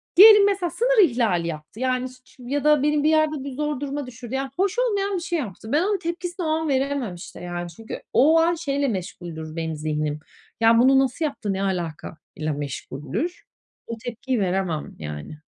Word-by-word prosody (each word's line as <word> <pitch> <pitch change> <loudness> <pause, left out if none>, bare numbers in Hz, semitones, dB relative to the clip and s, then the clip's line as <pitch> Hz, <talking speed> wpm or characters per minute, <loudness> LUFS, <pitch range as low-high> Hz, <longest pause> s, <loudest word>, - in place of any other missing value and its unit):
Diyelim 415 +1 +10
mesela 390 -3 +1
sınır 480 +1 +4
ihlali 215 -9 +1
yaptı, 155 +5 -7
yani, 255 0 0
ş 255 - -15
ş 255 - -18
ya 280 +3 -1
da 300 -2 +4
benim 295 0 +2
bir 310 - +4
yerde 310 -3 +2
bir 280 - -5
zor 295 +1 -2
duruma 285 -1 -4
düşürdü, 245 0 -7
yani, 270 0 -2
hoş 390 +5 +1
olmayan 405 -5 +1
bir 350 - -2
şey 345 -2 -1
yaptı. 220 -3 -6
Ben 300 +3 +3
onun 405 +1 +1
tepkisini 350 +1 -4
o - - 0
an 320 0 0
veremem, 270 -7 0
işte, 170 - -10
yani. 175 0 -5
Çünkü 220 +7 -8
o 315 +5 +6
an 335 +1 +3
şeyle 285 -3 -1
meşguldür 170 -6 -5
benim 160 -1 -3
zihnim, 150 -1 -2 0.4
ya 230 0 +5
bunu 265 +2 +6
nasıl 270 +4 0
yaptı, 235 -9 -2
ne 195 - -2
alaka 170 -5 -3 0.2
ile 155 0 -2
meşguldür. 145 - -4 0.4
O 230 - -5
tepkiyi 245 +1 -2
veremem, 185 -5 -1
yani. 75 - -7
255 Hz, 195 wpm, -24 LUFS, -, 0.4 s, Diyelim